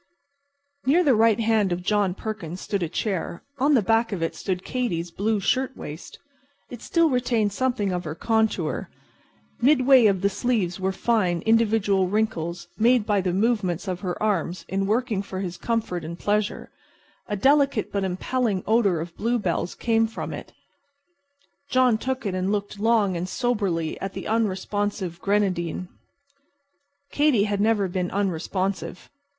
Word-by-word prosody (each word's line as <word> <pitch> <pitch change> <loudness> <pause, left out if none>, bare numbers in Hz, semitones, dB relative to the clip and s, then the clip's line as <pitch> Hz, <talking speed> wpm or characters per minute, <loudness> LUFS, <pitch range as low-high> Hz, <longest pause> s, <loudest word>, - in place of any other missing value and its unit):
Near 335 +7 +5
the 285 -5 +4
right 225 -1 +4
hand 220 -4 +2
of 175 +1 -2
John 200 -2 +1
Perkins 195 -6 -5
stood 200 0 -2
a 170 - -1
chair. 185 -2 -3 0.2
On 285 +3 +4
the 230 - +3
back 225 +3 +2
of 180 -5 -2
it 165 - -1
stood 185 -1 -3
Katy's 175 -10 -2
blue 210 +4 0
shirtwaist. 255 - -3 0.5
It 240 - -8
still 335 -1 +2
retained 235 -5 +1
something 240 -4 0
of 180 -1 -2
her 155 0 -4
contour. 220 +2 0 0.7
Midway 260 -2 +6
of 195 -3 +1
the 200 - +3
sleeves 200 -5 -1
were 190 0 0
fine, 190 -5 +1
individual 215 -4 +3
wrinkles 175 -4 -2
made 235 0 +4
by 205 -2 +2
the 180 -1 -1
movements 195 -3 0
of 180 -1 -2
her 180 -1 -3
arms 185 -4 -1
in 195 +1 -1
working 220 -1 0
for 190 -1 -6
his 180 -2 -4
comfort 215 -6 -2
and 170 +2 -6
pleasure. 210 +2 -1 0.6
A 210 - -2
delicate 275 +1 +2
but 200 -1 -1
impelling 190 +2 -1
odor 205 -7 +2
of 170 +1 -7
bluebells 210 -7 -1
came 225 -1 +2
from 225 - -6
it. - - -8 1.2
John 255 -4 +3
took 260 0 -3
it 195 - -1
and 185 +1 -1
looked 205 0 -3
long 215 -4 +2
and 175 +2 -3
soberly 200 -11 -1
at 195 0 -4
the - - -6
unresponsive 205 -4 -1
grenadine. 185 -4 0 1.2
Katy 290 -8 +3
had 205 -1 -1
never 210 -2 +2
been 180 0 -2
unresponsive. 190 0 -2
205 Hz, 155 wpm, -24 LUFS, 185-230 Hz, 1.2 s, Midway